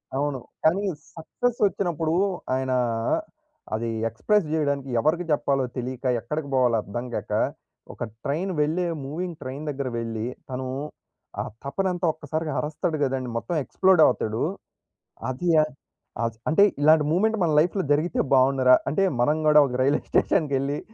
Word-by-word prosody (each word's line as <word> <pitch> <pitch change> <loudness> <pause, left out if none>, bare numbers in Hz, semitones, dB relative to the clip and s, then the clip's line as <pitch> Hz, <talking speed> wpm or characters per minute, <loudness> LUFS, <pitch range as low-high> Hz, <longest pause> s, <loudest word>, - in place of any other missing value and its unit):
అవును. 140 -1 -1 0.2
కానీ 170 +5 +3 0.3
సక్సెస్ 235 +9 -2
వచ్చినప్పుడు, 170 -5 -1 0.4
ఆయనా 130 0 0 1.0
అది 115 +1 -2 0.2
ఎక్స్‌ప్రెస్ 200 - +1
జేయడానికి 140 -3 0
ఎవరికి 165 +7 +1
జెప్పాలో 140 -2 +1
తెలీక 125 +1 -4 0.2
ఎక్కడికి 150 +6 -4
బోవాలో 125 -3 +3
అర్థం 120 +5 -5
గాక, - - -4 0.6
ఒక - - -6 0.2
ట్రైన్ 170 +7 -1
వెళ్లే 165 +4 +1 0.2
మూవింగ్ 165 +4 -4
ట్రైన్ 135 +4 -6
దగ్గరకి 135 -4 -3
వెళ్లి 115 -1 -4 0.2
తను 130 0 -4 0.7
ఆ - - -2 0.2
తపనంతా 180 +5 -1
ఒక్కసారిగా 155 +1 -4
అరస్తాడు 155 +1 -2
గదండీ! 130 -2 -1
మొత్తం 170 +8 -3
ఎక్స్‌ప్లోడ్ 185 +3 +3
అవుతాడు. 110 +2 0 0.9
అది 135 +8 -3
య 155 - +7 0.6
ఆస్ 115 -1 -2
అంటే 160 +6 +5 0.2
ఇలాంటి 155 +1 +6
మూమెంట్ 220 +6 +2
మన 165 - +2
లైఫ్‌లో 180 +4 +1
జరిగితే 155 +4 +1
బావుండురా! 130 -1 +5 0.2
అంటే 175 +6 +1 0.2
మనం 150 +6 +3
కూడా 150 0 +7
ఒక 125 - -5
రైల్వే 140 +3 +2
స్టేషన్‌కెళ్లి 140 -1 +1
145 Hz, 135 wpm, -25 LUFS, 130-165 Hz, 1.0 s, య